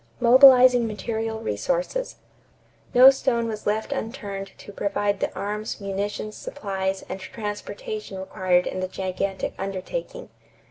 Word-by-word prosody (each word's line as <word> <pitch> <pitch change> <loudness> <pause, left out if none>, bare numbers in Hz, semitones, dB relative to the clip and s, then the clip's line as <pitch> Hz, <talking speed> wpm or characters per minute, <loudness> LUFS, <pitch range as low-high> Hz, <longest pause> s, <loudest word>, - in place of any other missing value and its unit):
=Mobilizing 250 -1 +7
Material 220 +1 -3
Resources.= - - -2 0.8
No 255 +2 +10
stone 240 -3 0
was 215 -2 -5
left 215 +5 -1
unturned 205 -7 -5
to - - -11
provide 205 0 -1
the - - -1
arms, 210 +3 -4
munitions, 205 +2 -4
supplies, 195 -6 -4
and - - -5
transportation 225 - -6
required 185 -2 +1
in 185 - -3
the 185 - -2
gigantic 190 +1 -3
undertaking. 350 - -5
210 Hz, 120 wpm, -24 LUFS, 195-250 Hz, 0.8 s, No